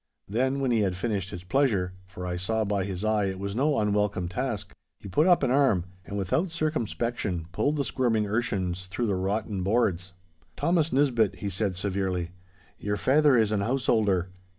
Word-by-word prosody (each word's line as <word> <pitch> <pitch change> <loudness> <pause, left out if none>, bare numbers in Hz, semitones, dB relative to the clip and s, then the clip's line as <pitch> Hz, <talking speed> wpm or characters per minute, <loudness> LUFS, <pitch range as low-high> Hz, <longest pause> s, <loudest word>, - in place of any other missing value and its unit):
Then, 130 +6 0
when 130 -2 +1
he 115 - +3
had 95 -3 +1
finished 100 -1 -2
his 90 -3 -7
pleasure—for 95 -6 -1
I 90 0 -2
saw 110 +5 0
by 100 -2 0
his 95 +1 -4
eye 110 -2 +2
it 95 -1 -2
was 100 +1 -4
no 140 +3 +2
unwelcome 105 -3 +1
task—he 110 -2 -5
put 150 - +3
up 175 -5 +5
an 130 - +2
arm, 130 -10 +3 0.2
and 100 - -4
without 130 - 0
circumspection 120 - -2
pulled 145 - 0
the 145 - 0
squirming 120 -5 +1
urchins 95 -5 -1
through 120 +6 -2
the 105 - +1
rotten 100 +1 -2
boards. 95 -3 0 0.4
'Thomas 165 -2 +1
Nisbett,' 125 -6 +2
he 100 - -4
said 95 0 -1
severely, 95 -2 -2 0.5
'your 105 0 -2
faither 145 +1 +4
is 110 -2 +3
an 105 -2 +1
householder. 105 -6 +1
105 Hz, 175 wpm, -27 LUFS, 95-125 Hz, 0.5 s, up